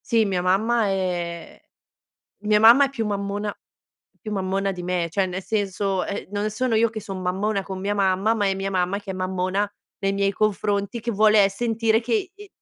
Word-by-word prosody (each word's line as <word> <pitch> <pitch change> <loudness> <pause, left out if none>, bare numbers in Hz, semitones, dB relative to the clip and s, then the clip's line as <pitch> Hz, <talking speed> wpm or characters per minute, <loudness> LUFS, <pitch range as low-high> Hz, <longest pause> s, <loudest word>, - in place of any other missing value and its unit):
Sì, 230 -3 +3
mia 190 -3 0
mamma 215 +5 +2
è 175 -3 -3 0.8
mia 210 0 +3
mamma 235 +6 +8
è - - -4
più 245 -5 -3
mammona 205 0 -3 0.6
più 215 - -6
mammona 195 0 -1
di 180 -1 -7
me, 175 -1 -1
cioè, 190 +3 +1
nel 185 +1 -4
senso, 195 -2 -1
eh, 200 - -5
non 205 +1 -1
sono 230 +2 0
io 230 +1 +3
che 220 0 -6
sono 195 -3 -7
mammona 195 +3 -1
con 190 0 -6
mia 200 +2 -1
mamma, 195 +2 +2
ma 210 -3 0
è 195 - +2
mia 195 0 -3
mamma 185 +1 0
che 200 -1 -7
è - - -6
mammona 185 +2 -1 0.3
nei 195 -1 0
miei 200 0 +1
confronti, 205 +1 -1
che 235 +1 -3
vuole, 210 -1 +5
eh, - - +1
sentire 225 +1 +1
che, 370 - -1
ehm, 415 0 -12
200 Hz, 200 wpm, -23 LUFS, 190-220 Hz, 0.8 s, mamma